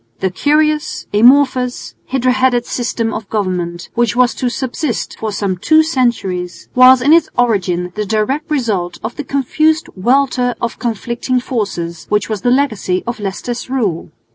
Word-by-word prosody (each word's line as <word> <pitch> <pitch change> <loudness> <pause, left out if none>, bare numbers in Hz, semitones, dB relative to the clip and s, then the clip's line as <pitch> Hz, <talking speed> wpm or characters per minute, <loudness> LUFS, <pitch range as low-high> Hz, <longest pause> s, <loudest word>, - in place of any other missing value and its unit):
The 190 - -1
curious, 300 +7 0
amorphous, 255 +2 +3
hydra 255 -1 +1
headed 250 -1 +2
system 235 -2 -2
of 215 -2 -6
government, 180 -5 -3
which 235 -1 +1
was 250 0 +3
to 250 - -2
subsist 255 0 -3
for 220 -1 -3
some 200 -2 -2
two 315 - +4
centuries, 235 - -2
was 255 0 +7
in 290 +4 +5
its 330 -1 +4
origin 185 -7 0
the 210 - -2
direct 220 - -1
result 215 - -1
of 220 +2 -4
the 295 - -5
confused 310 +4 0
welter 250 +3 +1
of 235 -1 -4
conflicting 235 +2 -2
forces, 190 -9 -4
which 210 0 0
was 215 -3 -3
the 245 - +1
legacy 225 -9 0
of 240 -1 -4
Leicester's 215 +5 -5
rule. 215 -11 -1
240 Hz, 155 wpm, -16 LUFS, 205-260 Hz, -, was